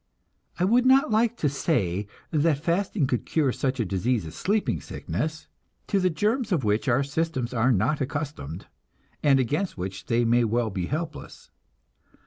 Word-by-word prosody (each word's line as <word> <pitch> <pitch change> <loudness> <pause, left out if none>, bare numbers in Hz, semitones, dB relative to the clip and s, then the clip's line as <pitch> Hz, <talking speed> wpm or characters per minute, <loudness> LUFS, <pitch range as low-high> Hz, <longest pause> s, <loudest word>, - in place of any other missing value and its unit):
I 175 - 0
would 240 +5 +4
not 265 -2 +5
like 230 +2 +2
to 150 - +1
say 105 - 0 0.2
that 155 -1 +2
fasting 175 -1 +1
could 125 -2 -1
cure 150 -5 +1
such 130 +1 -2
a 115 - +1
disease 100 +4 0
as 80 - -8
sleeping 200 - 0
sickness, 155 - -4 0.4
to 200 - +1
the 185 -1 +2
germs 215 - 0
of 165 -8 +1
which 105 +5 +1
our 130 +2 +3
systems 140 -4 -2
are 125 +2 +3
not 125 +8 +1
accustomed, 135 - -4 0.6
and 140 -2 +4
against 150 - -1
which 95 +1 -6
they 120 +1 +2
may 120 +1 +4
well 115 0 0
be 90 -2 -3
helpless. 155 0 -6
140 Hz, 165 wpm, -26 LUFS, 115-165 Hz, 0.6 s, not